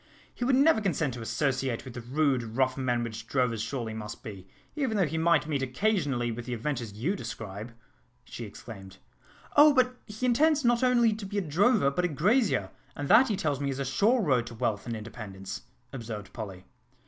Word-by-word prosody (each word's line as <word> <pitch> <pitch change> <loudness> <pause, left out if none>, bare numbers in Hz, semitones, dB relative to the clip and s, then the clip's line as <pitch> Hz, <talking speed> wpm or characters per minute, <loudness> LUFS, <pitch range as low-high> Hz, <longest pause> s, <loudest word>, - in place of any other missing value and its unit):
"He - - -5
would 260 +1 +3
never 275 -3 +5
consent 160 - 0
to 120 - -7
associate 135 0 -1
with 130 - -8
the 120 - -6
rude, 135 +1 +1 0.2
rough 130 -1 +2
men 125 -3 0
which 115 -1 -6
drovers 125 -4 0
surely 115 -1 -3
must 105 -1 -7
be, 95 -4 -9 0.3
even 265 -8 0
though 190 - +3
he 160 +2 -2
might 165 -2 +3
meet 150 -3 -1
occasionally 135 - 0
with 120 +1 -6
the 125 - -2
adventures 120 -3 -3
you 135 - -1
describe," 110 - -7 0.5
she 120 - -8
exclaimed. 95 -3 -11 0.6
"Oh! 295 0 +7
but 250 -1 +3
he 215 +4 -4
intends 290 +4 +3
not 240 +1 +3
only 240 -3 +4
to 210 -1 -6
be 205 +1 -4
a - - +2
drover, 185 - +3
but 180 +6 -1
a - - +3
grazier; 175 - +1 0.2
and 145 -1 -4
that, 260 - +7
he 215 - 0
tells 145 -7 -1
me, 140 -1 -1
is 135 - -3
a 140 - -2
sure 210 - +2
road 125 -8 +2
to 120 - -8
wealth 110 -2 -2
and 115 - -2
independence," 105 -3 -7 0.3
observed 110 -6 -7
Polly. 95 -5 -7
135 Hz, 200 wpm, -28 LUFS, -, 0.6 s, Oh